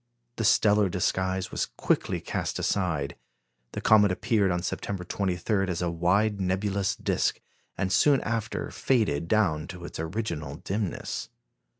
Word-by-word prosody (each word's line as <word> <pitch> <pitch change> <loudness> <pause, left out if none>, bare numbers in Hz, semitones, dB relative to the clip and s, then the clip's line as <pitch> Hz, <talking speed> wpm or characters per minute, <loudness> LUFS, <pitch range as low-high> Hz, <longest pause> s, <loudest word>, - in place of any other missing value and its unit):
The 115 - -1
stellar 105 -2 +4
disguise 95 +1 -1
was - - -1
quickly - - 0
cast - - -3
aside. 80 -8 -1 0.6
The - - -4
comet 105 -2 +5
appeared 105 0 +1
on 90 -1 -1
September 95 0 -3
23 95 +2 -1
as 90 -3 -2
a 85 - 0
wide 100 +5 +1
nebulous 95 +1 0
disc, - - 0 0.4
and 95 +1 0
soon 140 +5 +5
after 110 -1 -3
faded 105 - +1
down 85 -7 +2
to 90 -1 -8
its - - -8
original 80 -5 -3
dimness. 95 +3 -3
95 Hz, 135 wpm, -27 LUFS, 90-105 Hz, 0.6 s, comet